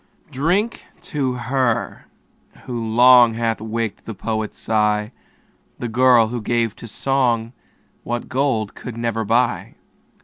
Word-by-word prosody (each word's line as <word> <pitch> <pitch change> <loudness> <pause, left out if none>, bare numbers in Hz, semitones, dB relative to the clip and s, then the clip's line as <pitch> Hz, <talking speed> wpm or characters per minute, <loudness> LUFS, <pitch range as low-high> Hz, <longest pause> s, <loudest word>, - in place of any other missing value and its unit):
Drink 180 - -1 0.2
to 135 -4 -1
her, 125 -1 -1 0.6
who 120 -3 -4
long, 120 0 +6
Hath 115 -1 -1
waked 110 -1 -4
the 110 - -6
poet's 110 +2 -3
sigh. 105 0 0 0.7
The 120 - -4
girl, 120 -1 +4
who 120 0 -4
gave 115 -1 0
to 115 - -9
song 120 -2 0 0.5
What 120 0 -4
gold 125 -6 -1
could 120 -2 -8
never 115 -1 -1
buy. 115 +3 0
115 Hz, 125 wpm, -20 LUFS, 110-125 Hz, 0.7 s, long